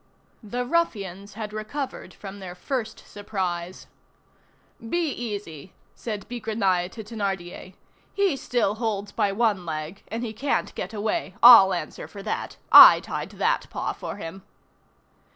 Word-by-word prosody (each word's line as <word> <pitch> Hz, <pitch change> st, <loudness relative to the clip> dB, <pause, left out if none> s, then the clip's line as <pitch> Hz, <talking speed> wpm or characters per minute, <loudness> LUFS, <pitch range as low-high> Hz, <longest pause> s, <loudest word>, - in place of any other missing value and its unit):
The 245 Hz, +3 st, -4 dB
ruffians 205 Hz, -, -2 dB
had 215 Hz, -1 st, -6 dB
recovered 220 Hz, +6 st, -5 dB
from 200 Hz, 0 st, -10 dB
their 180 Hz, -2 st, -8 dB
first 225 Hz, +3 st, -4 dB
surprise. 185 Hz, -3 st, -4 dB, 0.9 s
"Be 320 Hz, +8 st, -1 dB
easy," 200 Hz, -, -6 dB, 0.2 s
said 210 Hz, -4 st, -6 dB
Bigrenaille 210 Hz, -6 st, -1 dB
to 220 Hz, -, -8 dB
Thénardier. 195 Hz, -4 st, -5 dB, 0.4 s
"He 395 Hz, -6 st, +1 dB
still 240 Hz, -6 st, 0 dB
holds 205 Hz, -3 st, -2 dB
by 200 Hz, -, 0 dB
one 205 Hz, -3 st, +1 dB
leg, 160 Hz, +3 st, -5 dB
and 230 Hz, +2 st, -4 dB
he 225 Hz, -2 st, -4 dB
can't 275 Hz, +6 st, -1 dB
get 190 Hz, -, -5 dB
away. 205 Hz, -2 st, -2 dB
I'll 235 Hz, -6 st, +10 dB
answer 175 Hz, -, -5 dB
for 200 Hz, -1 st, -10 dB
that. 215 Hz, -, -4 dB
I -, -, +11 dB
tied -, -, -5 dB
that -, -, 0 dB
paw -, -, -3 dB
for -, -, -7 dB
him." 195 Hz, -1 st, -8 dB
205 Hz, 135 wpm, -25 LUFS, 190-230 Hz, 0.9 s, I